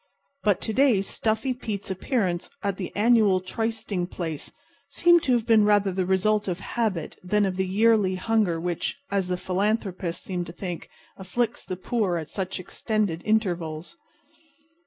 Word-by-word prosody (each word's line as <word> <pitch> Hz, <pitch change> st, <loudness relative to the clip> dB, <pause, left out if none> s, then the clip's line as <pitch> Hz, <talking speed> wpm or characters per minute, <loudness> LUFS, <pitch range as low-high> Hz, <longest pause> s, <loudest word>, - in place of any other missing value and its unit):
But 205 Hz, -4 st, +2 dB
to 220 Hz, -, -2 dB
day 250 Hz, -6 st, +4 dB
Stuffy 220 Hz, +6 st, 0 dB
Pete's 205 Hz, -5 st, -5 dB
appearance 190 Hz, -3 st, -1 dB
at 200 Hz, -2 st, -1 dB
the 185 Hz, -, -4 dB
annual 215 Hz, -3 st, +4 dB
trysting 220 Hz, -2 st, -2 dB
place 165 Hz, -5 st, -5 dB, 0.4 s
seemed 345 Hz, -1 st, +5 dB
to 260 Hz, -, +2 dB
have 235 Hz, -2 st, +1 dB
been 225 Hz, -3 st, +5 dB
rather 205 Hz, -1 st, +3 dB
the 185 Hz, -1 st, -1 dB
result 205 Hz, +3 st, +2 dB
of 180 Hz, -1 st, -2 dB
habit 205 Hz, -10 st, -2 dB
than 205 Hz, +3 st, +2 dB
of 190 Hz, -1 st, -1 dB
the 190 Hz, 0 st, 0 dB
yearly 205 Hz, -1 st, +3 dB
hunger 190 Hz, -3 st, +1 dB
which, 175 Hz, 0 st, -2 dB
as 195 Hz, -2 st, +1 dB
the 180 Hz, 0 st, -1 dB
philanthropists 190 Hz, -2 st, -1 dB
seem 180 Hz, -2 st, -3 dB
to 170 Hz, -, -8 dB
think, 175 Hz, -2 st, -6 dB, 0.3 s
afflicts 220 Hz, +5 st, -2 dB
the 185 Hz, -, -5 dB
poor 190 Hz, -2 st, 0 dB
at 160 Hz, -2 st, -6 dB
such 190 Hz, -1 st, -3 dB
extended 195 Hz, -2 st, -1 dB
intervals. 175 Hz, -, -1 dB
195 Hz, 155 wpm, -26 LUFS, 180-220 Hz, 0.4 s, seemed